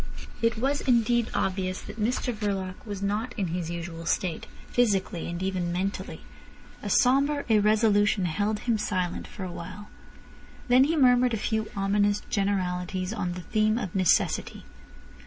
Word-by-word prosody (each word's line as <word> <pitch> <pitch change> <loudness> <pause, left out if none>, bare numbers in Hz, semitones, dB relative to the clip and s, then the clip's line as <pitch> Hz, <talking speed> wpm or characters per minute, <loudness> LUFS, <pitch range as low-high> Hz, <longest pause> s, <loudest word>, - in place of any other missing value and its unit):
It 230 0 +2
was 275 +5 0
indeed 235 -2 +2
obvious 185 -1 -1
that 220 - -8
Mr 245 +2 0
Verloc 200 -4 -2
was 200 -1 -5
not 215 +4 -2
in 190 -5 -1
his 170 -1 -3
usual 170 -1 -6
state, 175 -4 -1 0.2
physically 195 -8 +1
and 175 +2 -4
even 185 -2 -1
mentally. 190 +3 -3 0.6
A - - -4
sombre 280 +3 +3
irresolution 210 -2 +3
held 205 +5 -1
him 230 -3 0
silent 185 -4 -2
for 195 - -8
a 185 - -4
while. 185 +5 -8 0.8
Then 255 +2 +6
he 320 +3 +1
murmured 250 -3 +4
a - - -2
few 220 0 -1
ominous 205 +1 +1
generalities 185 -1 -1
on 180 -5 -2
the 180 - -6
theme 215 +4 +1
of 195 -8 -4
necessity. 185 - +1
205 Hz, 150 wpm, -27 LUFS, 185-230 Hz, 0.8 s, Then